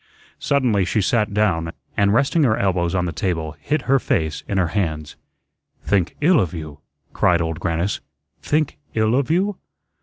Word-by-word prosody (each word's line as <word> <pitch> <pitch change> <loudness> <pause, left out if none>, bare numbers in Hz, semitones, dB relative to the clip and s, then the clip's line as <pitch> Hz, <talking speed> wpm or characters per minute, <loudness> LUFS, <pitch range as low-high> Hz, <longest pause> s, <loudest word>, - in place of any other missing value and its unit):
Suddenly 125 -8 +2
she 95 - 0
sat 105 0 +1
down, 90 -6 0 0.2
and 100 0 +3
resting 140 +8 +2
her 110 -5 +3
elbows 90 -2 0
on 90 -1 +1
the 85 - -2
table, 80 -3 -2
hid 150 -2 -1
her 135 +1 +3
face 80 -9 -1
in 100 - -1
her 90 -3 +2
hands. 80 -6 -2 0.7
"Think 95 -4 0
ILL 165 +2 +5
of 90 -1 -1
you?" 75 -3 -7 0.3
cried 85 -1 +3
Old 80 -1 -2
Grannis, 85 +3 -1 0.4
"think 155 -1 0 0.2
ILL 110 0 +2
of 135 +2 +1
you? 190 +4 +1
100 Hz, 170 wpm, -21 LUFS, 85-125 Hz, 0.7 s, ILL